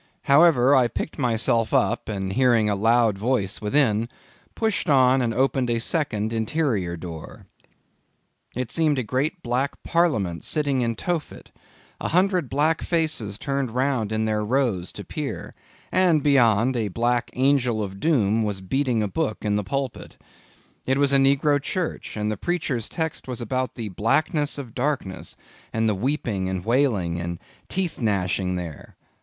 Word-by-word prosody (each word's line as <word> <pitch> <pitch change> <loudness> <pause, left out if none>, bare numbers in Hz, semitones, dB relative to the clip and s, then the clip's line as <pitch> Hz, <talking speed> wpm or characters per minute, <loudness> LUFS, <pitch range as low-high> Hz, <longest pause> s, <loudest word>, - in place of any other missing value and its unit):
However, 140 -3 +5
I 125 -2 +4
picked 155 - -5
myself 115 -3 +1
up - - +1
and 95 -2 -3
hearing 120 -3 +3
a 105 - +1
loud 115 0 +2
voice 105 -4 -1
within, 110 -1 +1 0.5
pushed 220 -6 -1
on 130 -2 +5
and 120 -2 0
opened 130 0 +1
a 120 - +1
second, 115 -6 -1
interior 110 - -1
door. 80 -2 -9 1.1
It 125 -1 -3
seemed 155 -3 +2
the 130 - 0
great 140 - -2
Black 130 +3 -2
Parliament 120 - 0
sitting 140 -4 0
in 115 -1 0
Tophet. 175 +1 -4 0.5
A - - -2
hundred 180 -4 +1
black 150 +4 +1
faces 155 - 0
turned 140 -1 -2
round 125 -3 -1
in 110 0 0
their 105 -1 0
rows 110 -7 0
to - - -7
peer; - - -5 0.4
and 175 -5 +3
beyond, 125 -4 +3
a 115 -3 0
black 120 +4 0
Angel 125 -4 +2
of 95 -1 -7
Doom 115 -8 +2
was 105 -3 -1
beating 120 +3 0
a - - 0
book 105 +3 -3
in 105 -1 +1
a - - -3
pulpit. 135 +5 -4 0.7
It 130 +1 +2
was 140 0 +3
a - - +6
negro 140 +1 +3
church; 170 -6 -4
and 105 0 -1
the 105 - -3
preacher's 140 - -2
text 160 -4 -3
was 125 -1 -4
about 130 +2 -2
the 115 -4 -5
blackness 145 - +1
of 130 -6 -7
darkness, 125 -8 -3 0.4
and 110 0 0
the 110 - +2
weeping 105 -4 -1
and 95 -1 -4
wailing 110 -9 +1
and 85 0 -4 0.3
teeth 185 -6 -2
gnashing 95 -3 0
there. 85 -4 -7
120 Hz, 160 wpm, -24 LUFS, 105-140 Hz, 1.1 s, a